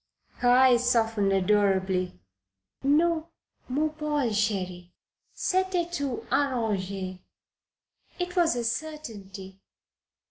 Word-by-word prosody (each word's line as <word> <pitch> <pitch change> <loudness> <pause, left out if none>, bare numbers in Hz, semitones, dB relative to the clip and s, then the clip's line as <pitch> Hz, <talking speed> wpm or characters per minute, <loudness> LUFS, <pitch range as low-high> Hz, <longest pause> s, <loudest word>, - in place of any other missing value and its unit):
Her 245 - +2
eyes 250 -1 +5
softened 225 -4 +2
adorably. 190 - +1 0.6
"Non, 315 +3 +2 0.4
mon 300 +4 0
Paul, 300 -5 -1
cheri. 185 -4 -2 0.4
C'etait 370 -2 0
tout 285 -7 -3
arrange. 200 -8 -1 1.0
It 355 0 -3
was 340 -6 +3
a 240 - -2
certainty." 210 -9 -5
235 Hz, 85 wpm, -27 LUFS, 195-300 Hz, 1.0 s, eyes